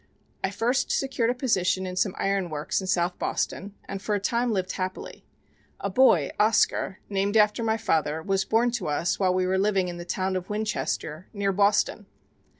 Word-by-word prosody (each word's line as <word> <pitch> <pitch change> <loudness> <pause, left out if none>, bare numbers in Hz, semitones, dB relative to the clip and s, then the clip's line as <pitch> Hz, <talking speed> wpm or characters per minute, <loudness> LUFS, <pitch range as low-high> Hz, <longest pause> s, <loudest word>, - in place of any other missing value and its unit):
I - - +1
first 235 +6 0
secured 255 -4 0
a 245 - 0
position 190 -7 +1
in 180 0 -5
some 185 +1 0
iron 195 -2 0
works 150 +4 -2
in 190 - -6
South 175 -1 0
Boston, 200 +1 -2
and 195 -1 -5
for 210 +1 -1
a - - 0
time 235 +4 0
lived 185 -3 -1
happily. 185 0 -5 0.5
A 200 - -3
boy, 190 - +4
Oscar, 210 -2 +2
named 200 +1 0
after 210 +2 +3
my 220 0 +1
father, 160 -6 0
was 195 0 +1
born 230 +4 +2
to 230 -8 -3
us 150 +4 0
while 185 -2 +2
we 185 0 +1
were 190 +1 +1
living 195 -2 +1
in 175 - -6
the 175 - -6
town 185 +2 -2
of 185 0 -4
Winchester 210 -6 -3
near 200 -1 0
Boston. 205 +1 +2
195 Hz, 190 wpm, -26 LUFS, 185-215 Hz, 0.5 s, boy